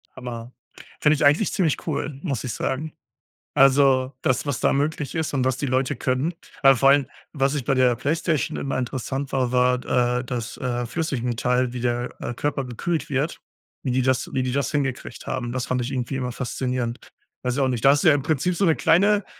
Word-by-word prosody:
Hammer. 120 -1 -7 0.5
Finde 150 0 +5
ich 145 - +1
eigentlich 150 +8 +4
ziemlich 165 -6 0
cool, 145 -2 -3
muss 140 -9 -2
ich 125 - -3
sagen. 150 +7 -3 0.6
Also, 135 -1 +4
das 130 +3 +1
was 140 -4 -2
da - - +3
möglich 145 0 -1
ist 160 -3 -2
und 130 -2 +1
was 130 -1 +1
die 140 - -1
Leute 130 0 0
können, 130 +7 -1 0.3
aber 135 -1 +7
vor 135 +3 +5
allem, 140 -1 +4 0.3
was 135 0 +1
ich 135 - -3
bei 135 - +1
der 125 -2 +3
PlayStation 155 +2 -1
immer 135 -1 -2
interessant 130 +2 -3
war, 130 -2 +1
war, 125 0 +2 0.4
äh, 125 - -6
das, 120 -2 -4
äh, 120 -2 -2
Flüssigmetall, 125 -4 -1
wie 125 - -5
der, 120 0 -1
äh, - - -3
Körper 140 +1 -2
gekühlt 150 +5 -3
wird, 140 +5 -1 0.4
wie 130 - -2
die 130 +1 +2
das 130 -1 0
wie 130 - 0
die 125 - -1
das 140 -1 0
hingekriegt 135 -3 -3
haben. 125 -2 -3
Das 130 -1 -2
fand 125 0 0
ich 120 - -4
irgendwie 130 0 -2
immer 125 -2 -3
faszinierend. 125 -1 -3 0.3
Weiß 125 -1 -1
ich 140 - 0
auch 135 - +3
nicht. 120 -4 -2
Da 135 - +8
hast 145 +1 +3
du - - +6
ja 155 - +7
im 145 - 0
Prinzip 160 +3 0
so 195 - 0
‘ne 160 - +4
kleine 200 +5 +3
130 Hz, 215 wpm, -23 LUFS, 125-145 Hz, 0.6 s, Da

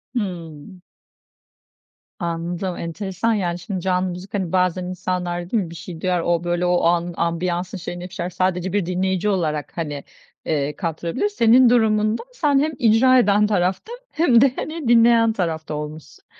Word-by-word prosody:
Hımm. 180 -4 -5 1.4
Anladım, 175 +1 -3
enteresan. 190 +6 -2
Yani, 180 -4 -1
şimdi, 185 +1 -5
canlı 185 0 0
müzik, 180 +2 -8
hani, 190 -5 -2
bazen 185 -1 +1
insanlar, 180 -1 -3
değil 220 -5 +2
mi 165 - -8
bir 170 - -10
şey 165 0 -9
duyar, 180 -2 0
o, 170 0 0
böyle, 175 +1 0
o 175 0 +2
anın 170 +1 +1
ambiyansın 175 +2 -2
şeyinde 175 0 -6
bir - - -17
şeyler, 175 -1 -3
sadece 185 0 -1
bir 205 -4 +1
dinleyici 190 +2 0
olarak, 155 -6 -1
hani, 145 -4 -4 0.4
eee, 150 -1 -1
kattırabilir. 170 - -2
Senin 245 - +5
durumunda 220 - +2
sen 295 - +2
hem 310 +2 +1
icra 255 +2 +5
eden 210 -2 +3
tarafta 190 - -1 0.2
hem 260 -8 +4
de, 270 -2 +5
hani, 310 -4 -5
dinleyen 230 -1 +5
tarafta 160 -6 -3
olmuşsun. 150 +1 -8
185 Hz, 155 wpm, -21 LUFS, 170-215 Hz, 1.4 s, Senin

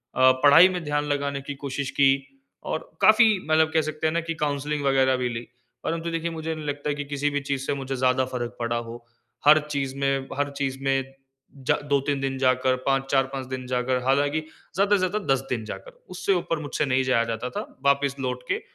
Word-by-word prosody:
अ, 130 0 +6
पढ़ाई 165 +6 +8
में 175 - -3
ध्यान 145 0 -1
लगाने 140 -1 -2
कि 145 - -4
कोशिश 135 0 -3
की। 135 -1 +7 0.5
और 160 - -4
काफ़ी 215 0 +6
मतलब 160 0 +3
कह 160 - +4
सकते 155 +1 -2
हैं 155 - -1
ना 170 - +1
कि 165 - +1
काउंसलिंग 145 +1 -2
वगैरह 135 -1 +3
भी 125 - 0
ली। 115 0 -6 0.4
परंतु 165 +1 -2
देखिए, 165 0 -2
मुझे 160 -1 -4
नहीं 155 -1 -7
लगता 145 0 -2
कि - - -3
किसी 145 0 -1
भी 145 0 -2
चीज़ 135 -1 -1
से - - 0
मुझे 135 -1 -4
ज़्यादा 130 +1 +2
फ़र्क 120 -1 -4
पड़ा 120 0 -1
हो, 120 0 -7 0.4
हर 155 +1 +8
चीज 140 -2 -2
में 135 -1 0
हर 145 0 0
चीज़ 135 -1 -2
में 135 0 0 0.5
जा - - +4
2-3 140 0 +1
दिन 135 -1 -2
जाकर, 130 0 +2
5 135 0 +2
4-5 135 -1 0
दिन 130 -1 -5
जाकर 125 0 0
हालाँकि 145 +3 +2 0.4
ज़्यादा 200 +2 +3
से - - +3
ज़्यादा 185 +3 0
10 135 - +1
दिन 120 -3 -2
जाकर, - - -8 0.2
उससे 185 +2 0
ऊपर 165 -3 -1
मुझसे 150 0 -2
नहीं 130 -1 +1
जाया 130 -3 +2
जाता 115 +3 -3
था, - - -4 0.2
वापस 140 0 +2
लौट 125 -1 -3
के - - -1
140 Hz, 210 wpm, -25 LUFS, 130-155 Hz, 0.5 s, पढ़ाई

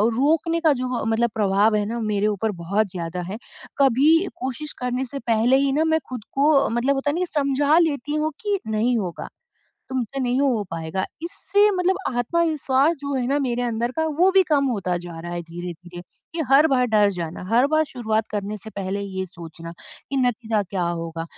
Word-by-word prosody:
रोकने 325 +5 +2
का 315 -3 +4
जो 250 -3 -2
मतलब 225 +1 +1
प्रभाव 210 +1 +3
है 210 -1 +1
ना 235 +2 -3
मेरे 205 +1 +1
ऊपर 210 +1 -1
बहुत 200 +5 +1
ज़्यादा 180 0 -4
है। 190 +5 -5 0.4
कभी 275 +1 +4 0.3
कोशिश 265 +4 -4
करने 250 +1 -1
से 275 +3 -6
पहले 235 +1 +2
ही 275 0 +2
ना 300 +3 +2
मैं 320 0 +2
खुद 245 -4 -6
को 280 0 +3
मतलब 240 +4 +1
होता 275 +2 -1
है - - -3
न - - -1
कि 365 - +1
समझा 290 +1 +2
लेती 295 -3 0
हूँ 310 +1 0
कि 410 -2 0
नहीं 225 +3 +1
होगा, 180 -5 -4 0.6
तुमसे 260 +1 -3
नहीं 250 +1 +1
हो 255 -7 +2
पाएगा। 165 +3 -3 0.2
इससे 405 +4 +2
मतलब 370 -1 +1 0.2
आत्मविश्वास 305 +1 +2
जो 280 -1 -3
है 255 -2 0
ना 280 +3 +1
मेरे 245 -3 -1
अंदर 235 0 -1
का 320 - +1
वो 370 +2 +5
भी 385 0 +6
कम 285 -2 +3
होता 195 -7 -1
जा 170 -1 -9
रहा 175 +1 -6
है 175 0 -3
धीरे-धीरे, 175 +1 -8 0.3
कि 330 - -3
हर 285 +4 +7
बार 255 -4 +2
डर 210 -3 +3
जाना, 170 -1 -5
हर 245 +4 +4
बार 310 +1 +2
शुरुआत 220 -5 -2
करने 205 0 -3
से 220 +2 -10
पहले 200 -1 -3
ये 190 -1 -4
सोचना 165 -1 -10 0.4
कि 275 - -1
नतीजा 230 -4 +1
क्या 190 -1 -3
होगा, 165 -1 -4
245 Hz, 200 wpm, -23 LUFS, 200-285 Hz, 0.6 s, हर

